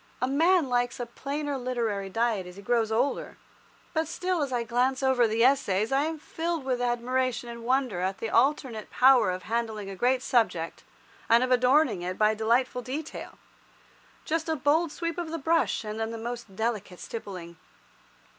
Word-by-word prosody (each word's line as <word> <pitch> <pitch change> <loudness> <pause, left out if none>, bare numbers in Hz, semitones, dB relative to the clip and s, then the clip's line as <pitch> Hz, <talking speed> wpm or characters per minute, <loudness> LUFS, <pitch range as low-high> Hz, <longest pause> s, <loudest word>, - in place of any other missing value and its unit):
A 255 - +1
man 325 +4 +3
likes 245 0 0
a 245 - -2
plainer 280 +3 -4
literary 230 -6 -2
diet 225 -3 0
as 180 - -11
he 200 - -10
grows 225 0 +1
older, 245 +6 -1 0.6
but 320 -1 0
still 360 +1 -1
as 280 -2 -1
I 240 -2 0
glance 250 +4 0
over 260 -3 +4
the 225 +1 +1
Essays 230 -6 +2
I 275 +2 +2
am 320 0 -3
filled 330 +1 -3
with 255 -2 -1
admiration 245 0 -1
and 235 0 -8
wonder 255 -5 +1
at 190 +1 -1
the 225 - -4
alternate 250 -3 +1
power 260 -5 +5
of 185 0 -3
handling 220 -3 -3
a - - -7
great 250 +6 +1
subject, 200 -11 0 0.5
and 230 +2 +6
of 255 - -1
adorning 255 - +4
it 180 +1 -4
by 215 0 +4
delightful 240 +3 +1
detail—just 310 +3 -7
a 320 - +1
bold 305 +3 +2
sweep 335 +1 -3
of 340 -2 -4
the 330 - -3
brush, 325 -4 +1
and 215 0 -5
then 225 0 -1
the 230 - -5
most 235 -3 -6
delicate 210 -4 -3
stippling. 180 -6 -7
245 Hz, 175 wpm, -27 LUFS, 220-275 Hz, 0.6 s, and